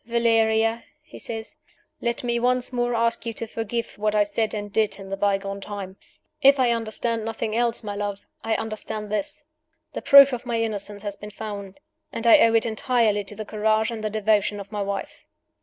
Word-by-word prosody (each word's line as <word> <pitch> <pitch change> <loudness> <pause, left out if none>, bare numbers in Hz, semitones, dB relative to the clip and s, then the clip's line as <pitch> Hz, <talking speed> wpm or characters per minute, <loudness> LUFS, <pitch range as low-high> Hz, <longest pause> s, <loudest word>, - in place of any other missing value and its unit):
"Valeria!" 225 -1 +2 0.2
he - - -13
says; 225 -1 -7 0.4
"let 235 +1 -2
me 235 -1 0
once 250 +1 +1
more 240 -1 0
ask 230 0 +1
you 230 - -4
to 230 - -4
forgive 225 0 -4
what 210 0 0
I 210 - +5
said 215 +2 -1
and 205 -1 -6
did 215 -2 +3
in 195 -1 -10
the - - 0
bygone 195 0 -1
time. 195 -2 -7 0.5
If 275 +1 +7
I 250 -2 +3
understand 230 0 -2
nothing 225 0 -3
else, 235 0 0
my 205 -1 -4
love, 205 -1 -3 0.2
I 225 0 0
understand 215 -1 -5
this: 215 +8 -4 0.5
The - - -4
proof 280 -1 +8
of 245 0 -4
my 235 -2 -2
innocence 205 -2 -3
has 205 -1 -4
been 210 +1 -9
found; 205 0 -7 0.3
and 230 - -5
I 230 - +8
owe 230 0 +5
it 225 - +3
entirely 225 -2 +1
to 210 - -3
the 215 +1 -6
courage 215 +1 +1
and 220 -2 -6
the 215 - 0
devotion 210 -1 +1
of 200 +1 -9
my 210 -1 -3
wife!" 200 0 -4
220 Hz, 200 wpm, -24 LUFS, 205-230 Hz, 0.5 s, proof